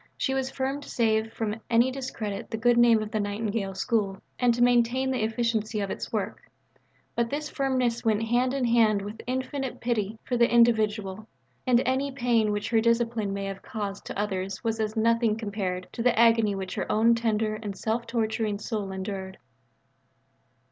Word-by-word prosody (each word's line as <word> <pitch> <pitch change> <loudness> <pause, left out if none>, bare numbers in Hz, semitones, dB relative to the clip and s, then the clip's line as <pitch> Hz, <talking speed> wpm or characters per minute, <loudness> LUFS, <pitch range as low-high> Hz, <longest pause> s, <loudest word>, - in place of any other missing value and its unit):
She 265 - 0
was 265 -1 -1
firm 270 +1 -2
to - - -11
save 220 -2 +1
from 220 -1 -3
any 235 +2 +4
discredit 230 -6 -5
the 225 - -3
good 240 +2 +3
name 235 -2 +5
of 215 - -7
the 215 - -1
Nightingale 205 -1 -2
School 195 -1 0 0.2
and 245 -1 +4
to 240 - +2
maintain 245 +2 +3
the 250 -4 0
efficiency 225 -1 -1
of 200 -1 -2
its - - -5
work; - - -4 0.7
but 235 -1 +1
this 300 +3 -3
firmness 255 -4 0
went 220 -1 +2
hand 240 +3 +2
in 265 -2 0
hand 225 -4 +3
with 210 +2 -7
infinite 260 +1 -3
pity 220 -3 -1
for 245 - -1
the 235 0 +4
individual, 215 -3 +2 0.4
and 245 -1 +4
any 265 +2 0
pain 240 -5 +2
which 205 +2 -2
her 225 -1 +4
discipline 230 -2 +1
may 195 0 -3
have 195 0 -5
caused 205 -4 -5
to - - -6
others 195 0 -3
was 225 -1 -1
as 215 0 -2
nothing 230 0 +3
compared 195 -4 -3
to 235 - -4
the 245 -1 +2
agony 225 -3 +4
which 190 -1 -5
her - - -3
own 225 +2 +4
tender 220 -2 0
and 205 -3 -5
self 230 +2 -2
torturing 220 -2 -1
soul 210 -2 -4
endured. 190 0 -5
225 Hz, 180 wpm, -27 LUFS, 210-240 Hz, 0.7 s, name